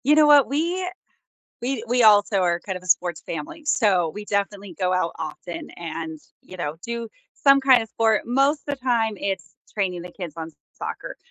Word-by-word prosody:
You 295 Hz, +2 st, +6 dB
know 305 Hz, -1 st, +6 dB
what? 290 Hz, -2 st, +7 dB
We, 345 Hz, +6 st, -1 dB, 0.7 s
we, 245 Hz, -2 st, -2 dB
we 245 Hz, +1 st, +2 dB
also 205 Hz, -2 st, +6 dB
are 175 Hz, -2 st, +2 dB
kind 190 Hz, 0 st, -5 dB
of 180 Hz, -, -8 dB
a -, -, -13 dB
sports 175 Hz, -2 st, +2 dB
family, 165 Hz, -, -6 dB
so 195 Hz, -, +3 dB
we 210 Hz, +6 st, -7 dB
definitely 200 Hz, -2 st, -2 dB
go 185 Hz, -1 st, +1 dB
out 185 Hz, -2 st, 0 dB
often 165 Hz, +2 st, -6 dB
and, 160 Hz, -1 st, -6 dB, 0.2 s
you 185 Hz, -, -12 dB
know, 155 Hz, -3 st, -3 dB
do 235 Hz, -1 st, -4 dB, 0.3 s
some 275 Hz, -2 st, +5 dB
kind 260 Hz, -3 st, +5 dB
of 225 Hz, -, -9 dB
sport. 220 Hz, -1 st, +2 dB
Most 275 Hz, +5 st, +2 dB
of 285 Hz, -1 st, -3 dB
the -, -, -36 dB
time, 230 Hz, -4 st, +2 dB
it's 195 Hz, 0 st, -3 dB, 0.2 s
training 185 Hz, -4 st, -1 dB
the 180 Hz, -, -9 dB
kids 175 Hz, -6 st, -7 dB
on 165 Hz, 0 st, -6 dB, 0.2 s
soccer, -, -, -6 dB
205 Hz, 195 wpm, -23 LUFS, 180-260 Hz, 0.7 s, what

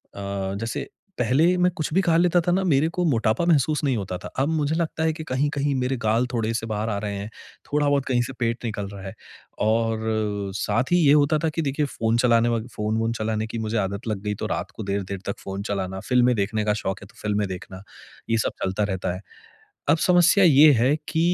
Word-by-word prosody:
अ, 100 Hz, -1 st, -4 dB
जैसे 115 Hz, +1 st, -4 dB, 0.3 s
पहले 150 Hz, +10 st, +3 dB
मैं 180 Hz, 0 st, +3 dB
कुछ 155 Hz, -2 st, -3 dB
भी 190 Hz, -, +4 dB
खा 170 Hz, -4 st, +2 dB
लेता 175 Hz, 0 st, +4 dB
था 175 Hz, -, 0 dB
ना, 190 Hz, +2 st, +2 dB
मेरे 150 Hz, -3 st, +3 dB
को 180 Hz, +1 st, -2 dB
मोटापा 115 Hz, 0 st, +1 dB
महसूस 155 Hz, -2 st, +2 dB
नहीं 130 Hz, -4 st, +1 dB
होता 95 Hz, -3 st, -4 dB
था। -, -, -8 dB
अब 140 Hz, +3 st, +1 dB
मुझे 155 Hz, -1 st, 0 dB
लगता 160 Hz, -1 st, -1 dB
है 160 Hz, -, +2 dB
कि 160 Hz, 0 st, -7 dB
कहीं-कहीं 140 Hz, +1 st, 0 dB
मेरे 130 Hz, 0 st, -1 dB
गाल 115 Hz, +3 st, +2 dB
थोड़े-से 115 Hz, -1 st, -1 dB
बाहर 110 Hz, +1 st, -2 dB
आ 105 Hz, -, -1 dB
रहे 105 Hz, -1 st, -4 dB
हैं, 100 Hz, +2 st, -6 dB, 0.4 s
थोड़ा-बहुत 145 Hz, -2 st, +2 dB
कहीं 125 Hz, -2 st, +1 dB
से 135 Hz, -, -6 dB
पेट 120 Hz, 0 st, -1 dB
निकल 105 Hz, -3 st, -3 dB
रहा 100 Hz, -1 st, -9 dB
है। 95 Hz, -, -7 dB, 0.5 s
और 110 Hz, -2 st, 0 dB
साथ 125 Hz, +8 st, -1 dB
ही -, -, +6 dB
ये 140 Hz, -, +6 dB
होता 150 Hz, +1 st, +4 dB
था 160 Hz, -, +2 dB
कि 165 Hz, +1 st, -2 dB
देखिए 145 Hz, +1 st, 0 dB
फ़ोन 115 Hz, -3 st, 0 dB
चलाने 120 Hz, -1 st, +3 dB, 0.3 s
फ़ोन-वोन 110 Hz, +2 st, -1 dB
चलाने 110 Hz, 0 st, -1 dB
की 115 Hz, -, -6 dB
मुझे 110 Hz, 0 st, -2 dB
आदत 100 Hz, +2 st, -2 dB
लग 105 Hz, -3 st, -2 dB
गई, 105 Hz, 0 st, -1 dB
तो -, -, -5 dB
रात -, -, -3 dB
को 110 Hz, -, -7 dB
देर-देर 100 Hz, -1 st, -3 dB
तक 100 Hz, -, -4 dB
फ़ोन 95 Hz, +1 st, -5 dB
चलाना, 95 Hz, -1 st, -3 dB
फ़िल्में 125 Hz, +1 st, +2 dB
देखने 105 Hz, +1 st, -1 dB
का 105 Hz, -, +2 dB
शौक़ 95 Hz, +1 st, -2 dB
है -, -, -11 dB
तो -, -, -23 dB
फ़िल्में 105 Hz, -1 st, 0 dB
देखना, 95 Hz, +1 st, -8 dB, 0.5 s
ये 115 Hz, -, +2 dB
सब 110 Hz, -, 0 dB
चलता 95 Hz, +3 st, 0 dB
रहता 95 Hz, -3 st, -2 dB
है। 90 Hz, -, -8 dB, 0.7 s
अब 160 Hz, -, +4 dB
समस्या 180 Hz, +2 st, +5 dB
ये 150 Hz, -2 st, +7 dB
है 130 Hz, +4 st, +4 dB
कि 160 Hz, -, 0 dB
115 Hz, 220 wpm, -24 LUFS, 105-145 Hz, 0.7 s, ये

